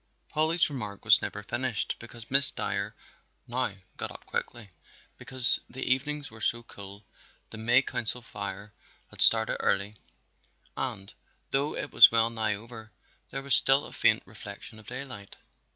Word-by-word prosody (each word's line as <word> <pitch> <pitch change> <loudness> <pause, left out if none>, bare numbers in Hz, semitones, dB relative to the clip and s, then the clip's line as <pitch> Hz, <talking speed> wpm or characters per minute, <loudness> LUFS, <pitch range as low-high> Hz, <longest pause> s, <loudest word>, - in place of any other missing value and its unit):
Polly's 160 +3 +2
remark 105 -9 -6
was 105 -1 +6
never 105 - -5
finished 120 0 -2
because 120 0 -12
Miss 135 0 +8
Dyer 100 +2 -2 0.5
now 125 -3 0 0.2
got - - -3
up - - -11
quickly. 115 -5 -5 0.5
Because 130 -2 +2
the 130 - -5
evenings 145 +2 -1
were 110 0 -13
so 120 +2 +1
cool 100 -2 -11 0.5
the 110 - -8
May 120 +4 +4
Council 120 0 -3
Fire 100 -1 -6 0.4
had - - -8
started 110 0 +4
early 100 +2 0 0.8
and 95 0 -5 0.4
though 140 +3 0
it 145 - -5
was - - +10
well 115 0 +4
nigh 110 -2 +1
over, 110 +1 -11 0.4
there 135 - -5
was 140 -2 -1
still 135 +2 +4
a - - -11
faint - - +3
reflection 105 +2 -10
of 105 - -17
daylight. 125 -6 -8
115 Hz, 150 wpm, -28 LUFS, 105-130 Hz, 0.8 s, was